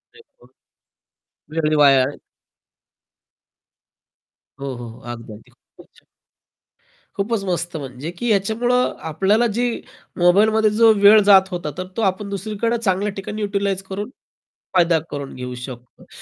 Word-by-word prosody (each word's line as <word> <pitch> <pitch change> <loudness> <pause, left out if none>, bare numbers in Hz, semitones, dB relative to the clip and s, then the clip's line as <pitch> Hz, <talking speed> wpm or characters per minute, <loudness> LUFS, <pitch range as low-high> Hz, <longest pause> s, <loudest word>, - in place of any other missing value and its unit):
अरे 455 - -16 0.2
व्वा! - - -19 1.1
वेळही 155 -1 +1
वाया 135 -2 +6 2.6
हो, 135 -1 -4
हो, 120 -1 -8 0.2
अगदी, 115 -2 -9
अगदी. 105 - -16
खूपच - - -21
छान. - - -24 1.1
खूपच 205 +1 -1
मस्त. 175 -1 -2
म्हणजे 135 +2 -7
की 240 - -2
याच्यामुळं 230 +5 +1 0.2
आपल्याला 200 +9 +2
जी 245 0 +1 0.5
मोबाईलमध्ये 215 +5 +4
जो 225 +2 +5
वेळ 210 +2 +8
जात 190 -1 +7
होता. 175 -4 -4
तर 185 0 -5
तो 230 - 0
आपण 200 0 -1
दुसरीकडे 215 +4 -2
चांगल्या 205 -2 0
ठिकाणी 200 +2 -6
यूटिलाइज 200 -2 -1
करून 205 +4 -4 0.7
फायदा 170 -2 +4
करून 140 -1 -6
घेऊ 125 0 -6
शकतो. 125 -2 -12
195 Hz, 125 wpm, -20 LUFS, 155-215 Hz, 2.6 s, वेळ